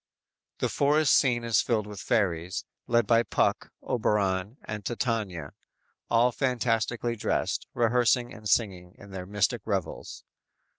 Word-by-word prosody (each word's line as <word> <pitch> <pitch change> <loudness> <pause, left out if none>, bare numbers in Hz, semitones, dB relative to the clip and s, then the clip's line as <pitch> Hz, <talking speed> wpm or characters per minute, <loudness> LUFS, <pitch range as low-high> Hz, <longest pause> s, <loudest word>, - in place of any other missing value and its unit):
"_ - - -56
The - - +1
forest 145 +1 +3
scene 120 -4 +3
is 115 -1 +3
filled 110 -4 0
with 105 -2 -8
fairies, 90 -5 0 0.2
led 120 -1 +3
by 115 +2 +4
Puck, - - 0
Oberon 105 -1 0
and 105 -1 -5
Titania, 105 - -2 0.6
all 120 +2 +4
fantastically 120 -2 0
dressed, 105 - -1
rehearsing 120 +1 +2
and 105 -1 -7
singing 95 -5 0
in 100 0 -13
their 90 -1 -6
mystic 105 +3 0
revels. 95 -7 -4
110 Hz, 135 wpm, -27 LUFS, 100-120 Hz, 0.6 s, by